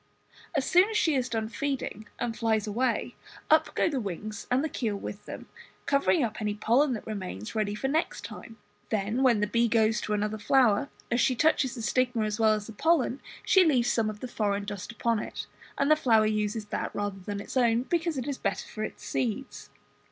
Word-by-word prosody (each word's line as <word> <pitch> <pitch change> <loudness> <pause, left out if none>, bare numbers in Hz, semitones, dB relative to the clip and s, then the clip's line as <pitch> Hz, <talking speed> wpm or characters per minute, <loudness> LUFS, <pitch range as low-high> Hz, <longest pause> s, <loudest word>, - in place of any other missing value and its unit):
As - - +1
soon 365 +3 +5
as 440 - 0
she 320 -7 +3
has 255 -2 0
done 220 -1 -1
feeding 250 -4 -3
and 235 -2 -2
flies 220 -2 +1
away, 235 +5 -1 0.4
up 310 -1 +4
go - - +3
the 285 -5 -1
wings 210 0 -5
and 255 +3 +2
the - - +1
keel 225 -8 -2
with 200 0 -7
them, - - -8 0.4
covering 280 +2 +3
up 220 -2 -3
any 210 -1 -1
pollen 250 +6 +3
that 220 - -5
remains 185 - -5
ready 210 -2 -1
for 270 - -2
next 310 +4 -1
time. 225 -1 -10 0.3
Then 215 +3 0
when 240 -5 +4
the - - +3
bee 235 +3 +2
goes 220 -1 +2
to 210 - -2
another 210 +1 -1
flower, 245 +2 +3 0.2
as 240 - +2
she 255 - +3
touches 265 -2 +2
the 230 - -6
stigma 245 0 +1
as 210 +1 -2
well 220 -1 +5
as 210 -1 -2
the 225 - -9
pollen, 290 0 +1 0.2
she 380 -1 +6
leaves 260 -8 +3
some 225 -2 +1
of 210 -1 -8
the 255 - -4
foreign 205 -4 -1
dust 205 +1 -6
upon 230 -1 0
it, - - -5 0.3
and 280 +2 +2
the - - +8
flower 225 -7 +4
uses 215 0 -1
that - - -2
rather 205 -1 -3
than 200 +2 -5
its 200 - -8
own, 240 -2 +3
because 335 +1 -1
it 255 - -3
is 280 -2 -3
better 200 - -2
for 215 - -5
its - - -7
seeds. 255 +2 -3
230 Hz, 215 wpm, -28 LUFS, 210-265 Hz, 0.4 s, the